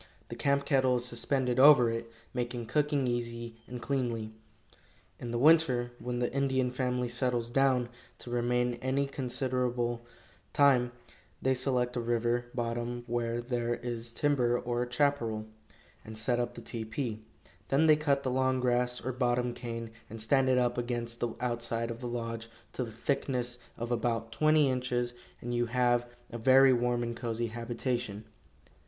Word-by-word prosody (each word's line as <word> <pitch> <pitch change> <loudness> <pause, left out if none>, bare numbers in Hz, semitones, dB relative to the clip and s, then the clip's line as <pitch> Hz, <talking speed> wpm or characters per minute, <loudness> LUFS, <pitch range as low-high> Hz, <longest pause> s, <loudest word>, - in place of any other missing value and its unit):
The - - -5
camp 140 0 +1
kettle 130 -2 +3
is 120 0 -1
suspended 125 +1 0
over 130 -4 +8
it, 115 0 -5 0.2
making 120 -1 -3
cooking 145 +2 +1
easy 115 -1 -3
and 125 0 -6
cleanly. 120 -4 -2 0.9
In 120 - -6
the 120 - -1
winter, 130 -4 +4
when 125 0 -3
the 120 0 -1
Indian 130 -2 +1
family 125 -1 -1
settles 120 -1 -1
down 130 -2 +3 0.3
to 120 - -9
remain 120 0 0
any 135 +2 +1
considerable 125 -3 -1 0.5
time, 130 -4 +4 0.5
they 130 - +2
select 125 -1 0
a - - 0
river 120 +1 0
bottom 120 0 -2
where 120 0 -1
there 120 -1 -1
is 120 -1 -4
timber 125 -3 +2
or 120 0 -2
chaparral, 125 -5 +1 0.6
and 110 0 -8
set 120 +3 +1
up 120 0 -2
the - - -8
tepee; 110 0 -4 0.5
then 140 +4 +3
they 155 -1 +7
cut 140 -2 +1
the 130 - -1
long 130 0 +1
grass 125 -1 0
or 130 - 0
bottom 125 -1 0
cane, 115 -2 -6 0.2
and 115 - -8
stand 130 +4 +3
it 130 - +4
up 125 -1 +1
against 120 -1 -3
the 120 -1 -2
outside 115 -1 -1
of 115 - -7
the 125 - -5
lodge 115 -1 -4 0.2
to 130 - -2
the 115 - -7
thickness 125 +1 -1 0.2
of 120 +1 -4
about 115 -1 -1
twenty 155 +3 +4
inches, 125 -1 -1 0.3
and 120 +1 -4
you 120 0 +1
have 120 0 +2 0.2
a 120 - -5
very 130 +2 +6
warm 120 0 +1
and 120 0 -3
cozy 115 -1 -2
habitation. 120 -2 -3
120 Hz, 160 wpm, -30 LUFS, 120-130 Hz, 0.9 s, over